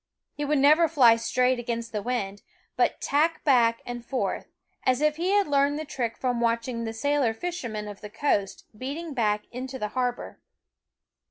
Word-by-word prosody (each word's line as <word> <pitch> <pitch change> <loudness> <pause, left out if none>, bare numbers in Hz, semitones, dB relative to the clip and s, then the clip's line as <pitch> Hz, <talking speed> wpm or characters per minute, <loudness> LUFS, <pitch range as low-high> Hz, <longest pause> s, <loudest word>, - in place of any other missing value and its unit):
He 295 - -4
would 295 +1 +1
never 305 +5 +5
fly 255 -8 +6
straight 250 +2 +1
against 235 -1 -4
the 210 - -2
wind, 205 -4 -3 0.3
but - - +1
tack 315 +3 +1
back 235 -5 +3
and 245 -1 -6
forth, 255 +2 -2 0.4
as 255 0 +2
if 305 0 +2
he 350 +3 -1
had 405 0 +4
learned 285 0 +2
the 310 - -4
trick 240 -5 -3
from 245 -2 -1
watching 230 0 0
the 225 - -3
sailor 275 -1 +1
fishermen 235 -10 -4
of 205 -1 -9
the 210 - -8
coast 210 -4 -1
beating 285 +7 -5
back 210 -4 +1
into 255 +2 -6
har 250 +1 0
bor. 245 - -11
250 Hz, 175 wpm, -26 LUFS, 230-290 Hz, 0.4 s, fly